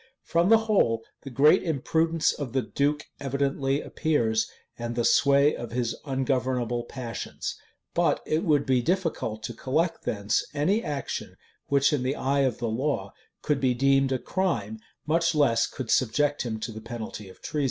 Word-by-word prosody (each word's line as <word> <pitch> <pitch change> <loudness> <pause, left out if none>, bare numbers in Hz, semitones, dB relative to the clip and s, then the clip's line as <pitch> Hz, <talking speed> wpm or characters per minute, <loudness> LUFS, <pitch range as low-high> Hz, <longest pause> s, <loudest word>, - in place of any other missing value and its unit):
From 170 +2 +2
the 225 - +8
whole, 115 - +2 0.2
the 135 - -8
great 140 +4 +5
imprudence 160 +1 +1
of 135 -5 -6
the 130 -2 +1
duke 145 +1 0
evidently 140 0 0
appears, 115 -9 0 0.3
and 120 0 -5
the 120 -1 0
sway 140 +1 +4
of 120 -1 -7
his 120 -2 -1
ungovernable 130 -3 -1
passions; 120 -2 -5 0.4
but - - +2
it 155 +1 0
would 150 -6 +2
be 130 -2 +2
difficult 145 - -1
to 120 - -4
collect 160 +9 -1
thence 100 0 0
any 185 +10 +1
action 145 -4 -4 0.3
which, 140 +1 +3
in 145 - +1
the 130 +2 -1
eye 140 +1 0
of 130 -3 +1
the 120 - -2
law, 115 -4 -2 0.3
could 150 -2 +1
be 130 -2 +2
deemed 135 +1 +3
a 130 - +2
crime, 115 - -2 0.3
much 165 +1 +2
less 120 -6 +3
could 130 -4 -5
subject 145 +4 +2
him 110 -3 -3
to 115 - -4
the 110 0 -8
penalty 110 -3 -7
of 95 - -15
treason. 150 - -4
135 Hz, 170 wpm, -26 LUFS, 120-150 Hz, 0.4 s, the